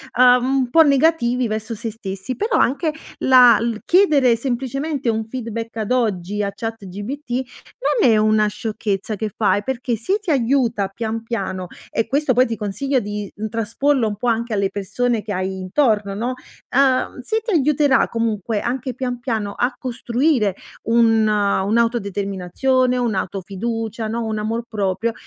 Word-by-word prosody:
ehm, 250 0 +6
un 265 -1 +1
po' 325 +6 +6
negativi 275 -4 +2
verso 220 +1 -3
se 225 +1 -4
stessi. 205 +2 -6
Però 455 +3 -1
anche 300 +5 +1 0.3
la 250 -3 +7
il 230 -1 -2
chiedere 300 -10 +4
semplicemente 270 +3 -2
un 220 -1 -1
feedback, 230 -2 -5
ad 220 +1 -3
oggi 210 -5 0
a 200 - -2
ChatGPT 225 +5 -6 0.7
non - - +5
è 220 - +4
una 215 0 +3
sciocchezza 210 -1 -3
che 215 +1 -4
fai, 205 -1 +2
perché 255 0 -2
se 375 - -1
ti 415 -4 -7
aiuta 240 -7 +1
pian 225 +2 -4
piano 190 -5 -4 0.2
e 225 - 0
questo 280 +2 +1
poi 250 +2 +4
ti 230 - -3
consiglio 255 +7 -1
di 205 -2 -5 0.2
trasporlo 230 +4 0
un 210 - -3
po' 245 +5 -4
anche 230 0 0
alle 200 -2 +1
persone 210 +4 -1
che 205 - -4
hai 190 0 -3
intorno, 205 +1 +1
no? 235 +5 -2 0.4
Ehm, 265 -1 +2
se 440 - -1
ti 455 - -4
aiuterà, 290 -2 +3
comunque, 225 -2 -1
anche 255 +3 -3
pian 250 0 -3
piano, 220 -5 -2
a 245 +1 +1
costruire 245 - 0 0.3
un 225 -1 +3
un'autodeterminazione, 210 +3 +1
un'auto-fiducia, 220 +1 -3
no, 230 +1 -2
un 220 -1 -2
amor 225 +2 -2
proprio, 215 +1 -1
230 Hz, 150 wpm, -20 LUFS, 210-255 Hz, 0.7 s, la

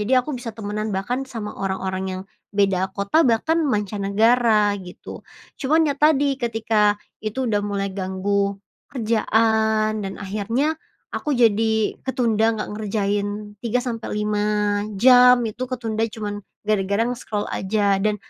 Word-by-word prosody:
Jadi 210 +5 -1
aku 255 +4 +1
bisa 245 -3 -5
temenan, 215 0 -3
bahkan 245 +7 -2
sama 215 -4 -5
orang-orang 190 -1 -3 0.2
yang - - -7 0.3
beda 190 -2 +2
kota 200 +10 +2
bahkan 285 +8 +2
mancanegara 210 +1 +2
gitu. 180 -1 -10 0.4
Cuman 310 +4 +3
ya 295 - +1
tadi, 285 -2 +3
ketika 220 -3 +1 0.2
itu 220 +5 -3
udah 205 -1 +2
mulai 200 -1 -2
ganggu 200 +1 -1 0.3
kerjaan, 220 -2 +1
dan 195 -1 -5
akhirnya 215 +9 -1 0.4
aku 300 -2 -1
jadi 220 -2 +2
ketunda 230 -4 +2
nggak 210 - -4
ngerjain 205 0 -2
3 240 +1 0
sampe 230 -3 -4
5 210 -1 0 0.2
jam, 250 +2 +7
itu 220 +3 -5
ketunda 225 -3 -1
cuman 210 -2 -5 0.3
gara-gara 200 0 +1
nge-scroll 225 -4 -3
aja, 200 0 +1
dan 210 0 +1
215 Hz, 130 wpm, -22 LUFS, 205-235 Hz, 0.4 s, jam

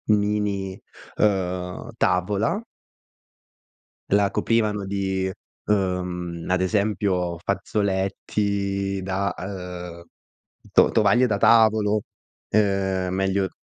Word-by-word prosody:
mini, 100 -2 -1 0.4
uhm, 90 -3 0
tavola. 105 - +1 1.5
La 100 0 +3
coprivano 105 -3 +1
di, 95 -1 -1 0.4
ehm, 90 -4 -1
ad 95 0 +2
esempio 95 -3 0
fazzoletti 100 +1 -1
da, 95 0 -1
ehm, 90 -3 -7 0.7
to - - +5
tovaglie 115 +4 +4
da 105 -4 0
tavolo. 110 -2 +4 0.5
Ehm, 95 -3 +1
meglio 95 0 +1
100 Hz, 80 wpm, -24 LUFS, 95-105 Hz, 1.5 s, to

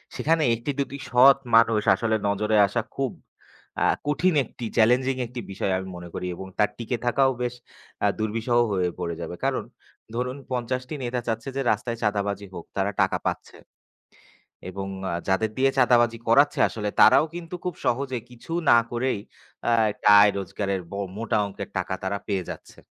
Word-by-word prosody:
সেখানে 160 +1 +1
একটি-দুটি 140 +3 -3
সৎ 130 +3 +7 0.2
মানুষ 115 -1 +5
আসলে 110 +3 0
নজরে 105 +2 0
আসা 110 +4 -1
খুব 135 -3 -1 0.7
আ - - +4 0.2
কঠিন, 150 +5 +2
একটি 120 +1 -8
চ্যালেঞ্জিং 125 +4 +4
একটি 120 +1 -7
বিষয়, 95 0 -1
আমি 95 0 -5
মনে 85 0 -9
করি, 90 - -4
এবং 95 - -8
তার 105 - +4
টিকে 120 +1 -3
থাকাও 135 +2 +3
বেশ 125 0 -2 0.5
আ - - +5
দুর্বিষহ 115 +2 0
হয়ে 90 -3 +1
পড়ে 85 -1 -3
যাবে। 85 +1 -5
কারণ, - - 0 0.5
ধরুন 125 +3 -2
৫০ 125 0 -1
টি 155 - -4
নেতা 120 0 -2
চাচ্ছে 115 +3 -2
যে 135 - 0
রাস্তায় 115 +2 -2
চাঁদাবাজি 100 -1 -1
হোক, 85 - -8
তারা 100 +1 +1
টাকা 95 - +2
পাচ্ছে। - - -4 1.1
এবং 95 +1 -5 0.2
আ - - -2 0.2
যাদের 105 +3 +1
দিয়ে 135 +1 +3
চাঁদাবাজি 120 -1 +4
করাচ্ছে, 140 +5 +4
আসলে 105 -2 -3
তারাও - - +7
কিন্তু 175 0 -6
খুব 180 -3 -2
সহজে 130 +1 0
কিছু 120 +6 -13 0.2
না 120 - +8
করেই, 120 -2 -1 0.5
আ - - +3 0.2
একটা 105 - +1
আয় 105 0 +6
রোজগারের 100 0 -3
ব - - -7 0.2
মোটা 110 -1 0
অংকের 100 - -7
টাকা - - -2
তারা 100 +1 -1
পেয়ে 100 -3 -1
যাচ্ছে। - - -9
115 Hz, 170 wpm, -25 LUFS, 100-130 Hz, 1.1 s, না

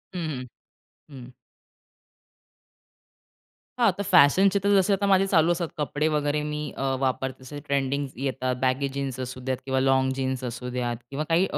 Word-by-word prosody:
हं, - - -2 0.2
हं, 125 - -8 0.6
हं. 130 -3 -10 2.5
हां, 235 -2 +5
तर 200 - -2
फॅशनचे 190 +3 +5
तर 200 - +2
जसे 195 +1 +3
आता 200 +1 0
माझे 195 0 +4
चालू 170 -3 +3
असतात 170 0 -1
कपडे 150 +1 -1
वगैरे 150 -1 0
मी 150 0 -3 0.2
अ, - - -3 0.2
वापरते 130 0 -2
जसे 145 +3 -8
ट्रेंडिंग 140 0 0
येतात. 130 -1 -2
बॅगे 130 +2 +1
जीन्स 135 -2 -3
असू 125 0 -5
द्यात 130 -1 -1
किंवा 130 -1 0
लाँग 130 0 +3
जीन्स 130 -1 -2
असू 125 0 -5
द्यात 120 -1 -2
किंवा 140 +2 -3
काही 170 +3 +4
अ, - - 0
140 Hz, 165 wpm, -25 LUFS, 130-160 Hz, 2.5 s, हां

